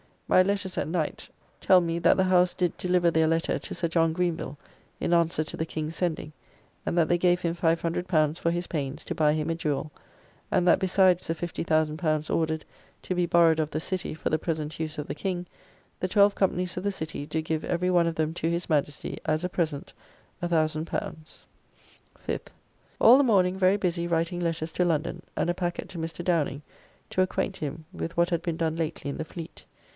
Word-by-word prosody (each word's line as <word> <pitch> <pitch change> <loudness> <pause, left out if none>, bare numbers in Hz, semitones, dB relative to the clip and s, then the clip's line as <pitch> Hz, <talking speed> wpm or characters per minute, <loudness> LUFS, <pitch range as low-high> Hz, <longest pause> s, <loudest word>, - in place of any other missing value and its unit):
My 185 - +6
letters 195 0 -1
at - - -1
night 160 -2 -2 0.3
tell 185 - +6
me, 170 0 -1
that 170 - +5
the 190 - +4
House 180 -1 +4
did 180 -2 0
deliver 180 -1 +2
their 160 -1 +3
letter 165 +1 +1
to - - -7
Sir 170 0 0
John 165 -1 +2
Greenville, 170 -4 -2 0.4
in - - 0
answer 170 -2 +2
to - - -6
the 160 - -1
King's 155 0 -5
sending, 160 -4 -2 0.5
and - - -1
that 165 -2 +3
they 175 - +4
give 175 0 +2
him 170 -2 0
L500 165 -1 +1
for 170 - 0
his 175 +1 -1
pains, 145 -2 -4
to - - -4
buy 150 -1 +3
him 155 +1 -1
a 165 - 0
jewel, 155 -1 -2 0.6
and 180 - +2
that 175 - +6
besides 185 -1 +3
the 165 - -1
L50,000 155 -2 0
ordered 160 -1 0 0.4
to - - -2
be 180 -1 +1
borrowed 165 -2 +5
of 155 -1 0
the 155 +1 -3
City 185 -1 -3
for 160 - -3
the 155 - +1
present 155 -1 -3
use 160 0 -3
of 150 - -3
the - - -4
King, 180 +2 -3 0.5
the 185 - 0
twelve 200 +1 +5
companies 180 -3 0
of 180 - -3
the 200 0 0
City 160 -5 -5
do 160 - -1
give 155 0 -2
every 180 +1 0
one 175 -2 +4
of 165 - -2
them 155 0 0
to 165 - -1
his 170 +1 -2
Majesty, 150 -1 -1
as 155 +2 0
a 180 - -1
present, 160 -5 -2 0.5
L1000. 155 -2 +1 1.4
5th. - - -3 0.5
All 240 +3 +8
the 285 - +4
morning 190 -5 +3
very 190 +1 +4
busy 175 -3 -1
writing 170 +1 0
letters 165 -2 -2
to 180 - +1
London, 170 +1 -1
and - - 0
a - - +2
packet 175 -1 -3
to 180 -2 -7
Mr. 165 +1 -5
Downing, 155 -5 0 0.5
to 185 - +2
acquaint 185 +1 -1
him 155 -1 -5
with 165 - -5
what 170 0 +3
had 170 -1 +1
been 170 -2 -3
done 165 -1 -1
lately 160 -3 -3
in - - -6
the 160 - -3
fleet. 165 0 -9
170 Hz, 205 wpm, -27 LUFS, 160-180 Hz, 1.4 s, All